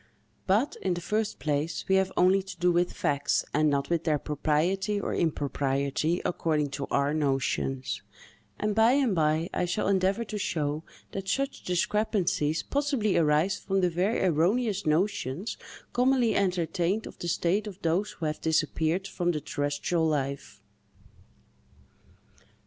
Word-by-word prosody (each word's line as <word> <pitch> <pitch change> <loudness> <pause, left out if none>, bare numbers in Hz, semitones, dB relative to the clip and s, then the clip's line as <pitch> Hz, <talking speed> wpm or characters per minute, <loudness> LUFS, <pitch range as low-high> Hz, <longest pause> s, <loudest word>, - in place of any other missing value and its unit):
But, 210 +9 +2
in 185 -2 0
the - - -3
first 215 +4 -1
place, 150 +2 -2
we 190 - +2
have 190 0 +1
only 185 +2 +5
to 190 0 -9
do 180 0 +3
with 175 +1 +2
facts, 145 -1 0
and 155 0 +3
not 140 +2 -1
with 170 -1 +1
their 155 -3 +2
propriety 165 +8 0
or - - -3
impropriety, 140 +1 0
according 150 -4 0
to 140 0 -4
our 140 +1 +1
notions; 135 -2 -1 0.6
and, 210 0 0
by 225 +3 +5
and 265 -6 +2
by, 160 0 +1
I - - 0
shall 175 +4 -1
endeavor 195 +3 +2
to 210 0 -5
show 150 -4 -1 0.3
that 195 0 -5
such 275 +7 -1
discrepancies 180 -4 0
possibly 275 -8 0
arise 155 +4 +2
from 195 -1 0
the 180 -1 +2
very 190 +7 0
erroneous 190 +4 +1
notions 185 +1 0 0.4
commonly 250 -2 +3
entertained 180 +1 0
of - - -11
the 175 - -4
state 175 +5 0
of 195 -2 -8
those 175 +5 0
who 165 - -5
have 155 0 -2
disappeared 160 +3 0
from 175 -2 -1
the 155 - -2
terrestrial 145 +4 -1
life. 140 -2 -3
175 Hz, 150 wpm, -28 LUFS, 150-200 Hz, 0.6 s, only